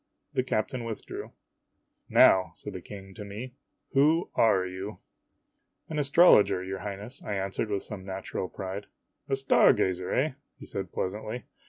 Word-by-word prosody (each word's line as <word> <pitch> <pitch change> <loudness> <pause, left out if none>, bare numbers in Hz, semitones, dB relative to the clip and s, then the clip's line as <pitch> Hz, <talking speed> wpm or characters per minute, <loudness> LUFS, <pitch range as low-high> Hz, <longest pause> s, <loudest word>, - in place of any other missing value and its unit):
The - - +2
captain 125 0 -1
withdrew. 115 -2 -6 0.4
" - - -48 0.3
Now," 95 -3 +6
said 105 - -8
the 95 - -6
King 95 +1 -10
to 105 - -8
me, 110 +6 -7 0.2
" - - -50
who 155 +5 +3
are 100 -5 +4
you? 95 +3 -6 0.3
" - - -49
" - - -46
An 155 -1 -2
astrologer, 140 - +6
your 95 0 -4
Highness," 105 +6 -7
I 105 - -3
answered 100 +3 -2
with 100 -2 -1
some 105 -3 -6
natural 95 -1 -4
pride. 95 +1 -6 0.4
"A 135 - +2
star 135 0 +5
gazer, 90 -1 -1
eh?" 150 +4 +2 0.3
he - - -11
said - - -5
pleasantly. 110 +5 -3
105 Hz, 170 wpm, -28 LUFS, 95-125 Hz, 0.4 s, Now